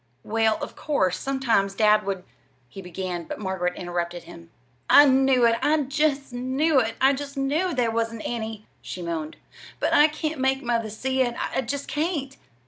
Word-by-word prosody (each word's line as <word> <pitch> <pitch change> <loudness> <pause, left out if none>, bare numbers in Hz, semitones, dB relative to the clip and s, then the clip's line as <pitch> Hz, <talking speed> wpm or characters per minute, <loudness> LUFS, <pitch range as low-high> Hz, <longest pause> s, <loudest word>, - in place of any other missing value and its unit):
"Well, 220 0 +1
of - - -7
course, 190 - 0
sometimes 235 -8 0
dad 210 0 +4
would" 190 -2 -2 0.4
he 195 +10 -10
began; 180 -1 -5
but - - -6
Margaret 190 -3 -2
interrupted 175 0 -4
him. 170 -1 -13 0.4
"I 290 - +9
knew 265 -2 +4
it 230 0 +3
I 310 +1 +3
just 275 -1 -1
knew 265 +4 +1
it 225 -2 -1
I 270 +1 +5
just 280 +1 -6
knew 300 +7 0
there 240 -3 +1
wasn't 230 0 -2
any," 220 -2 -4 0.2
she 180 - -7
moaned; 160 -2 -4 0.4
"but - - 0
I 295 - +7
can't 310 -1 -4
make 265 +1 +1
mother 230 -2 -1
see 260 +5 -1
it 240 -2 0
I - - -1
just 280 +3 -4
can't!" 295 -4 -2
240 Hz, 175 wpm, -25 LUFS, 195-275 Hz, 0.4 s, I